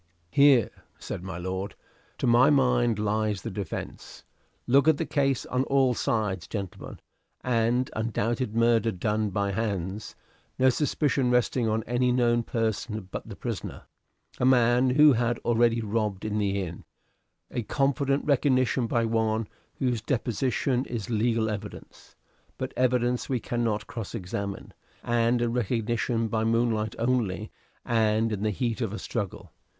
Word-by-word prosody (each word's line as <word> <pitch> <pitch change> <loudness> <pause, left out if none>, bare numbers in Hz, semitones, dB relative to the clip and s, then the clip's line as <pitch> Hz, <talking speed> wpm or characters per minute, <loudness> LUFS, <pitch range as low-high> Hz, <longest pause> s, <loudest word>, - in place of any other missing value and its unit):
"Here," 140 -6 +5 0.3
said - - -6
my 95 -1 -6
lord, 95 +3 -4 0.4
"to - - -2
my 120 +1 +5
mind, 125 -5 +3
lies 105 -1 -1
the 115 - -4
defence. 95 -3 -6 0.4
Look 140 +4 +4
at 160 -2 +5
the 165 - -2
case 135 -3 0
on 125 +1 0
all 135 -2 +3
sides, 105 -7 -1
gentlemen: 100 -4 -6 0.4
an 120 +1 +1
undoubted 115 +1 -1
murder 115 -1 +3
done 105 +3 -1
by 100 +1 -1
hands; 100 -1 -3 0.4
no 130 0 +5
suspicion 140 -2 +1
resting 125 -1 +2
on 110 +1 0
any 125 +2 +1
known 120 -1 +2
person 110 -3 -3
but - - -6
the - - -7
prisoner - - -5 0.6
a - - -1
man 125 0 +4
who 145 +3 +6
had 120 0 0
already 115 0 +3
robbed 105 -2 -2
in 105 0 -1
the 100 -1 0
inn; 85 -2 -7 0.7
a 125 - -2
confident 140 +3 0
recognition 130 -3 +2
by 115 0 +1
one 110 -1 0 0.3
whose 125 -4 -1
deposition 125 +1 0
is 120 0 -5
legal 115 0 +1
evidence, 105 -2 -8 0.4
but - - -4
evidence 125 -1 +1
we 130 -2 0
cannot 115 -2 -1
cross 115 -1 -6
examine; 100 0 -5 0.3
and 120 +1 +2
a - - +1
recognition 115 0 -1
by 110 0 -1
moonlight 115 -1 +1
only 115 -4 -1 0.3
and 110 -1 +2
in 105 -2 -3
the 110 - +1
heat 115 +3 -2
of 110 -4 -2
a - - -4
struggle. 100 -3 -5
115 Hz, 145 wpm, -27 LUFS, 105-125 Hz, 0.7 s, who